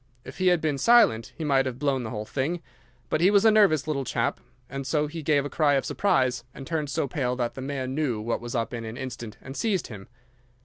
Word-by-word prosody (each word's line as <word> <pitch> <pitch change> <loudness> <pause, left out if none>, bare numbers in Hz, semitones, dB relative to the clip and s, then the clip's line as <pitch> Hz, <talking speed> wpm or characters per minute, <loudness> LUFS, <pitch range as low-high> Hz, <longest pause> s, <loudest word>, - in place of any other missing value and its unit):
If - - -10
he 185 - +2
had 175 -2 +4
been 150 -3 -1
silent 180 - +4
he 165 - -4
might 135 -3 +2
have 125 -2 -4
blown 135 -1 0
the 115 - -5
whole 105 -1 -4
thing, 155 +9 -2 0.5
but 155 - +1
he 180 - +6
was 205 +1 +4
a 220 - +7
nervous 195 -10 +4
little 150 -3 -1
chap, - - -1 0.4
so 150 +2 0
he 160 +2 -6
gave 145 -2 +2
a - - -1
cry 145 -1 +2
of 135 - 0
surprise 130 -12 +1
and 135 - -8
turned 155 -2 -2
so 140 - -1
pale 125 -2 -1
that 120 -2 -2
the 130 - -7
man 130 -1 -3
knew 135 -7 -1
what 115 +2 -2
was 120 +1 -6
up 115 +1 -1
in 115 -1 -4
an 110 +1 -7
instant 120 -4 -7
and 135 +1 -9
seized 200 -2 -1
him. 100 -4 -9
140 Hz, 240 wpm, -26 LUFS, 125-155 Hz, 0.5 s, a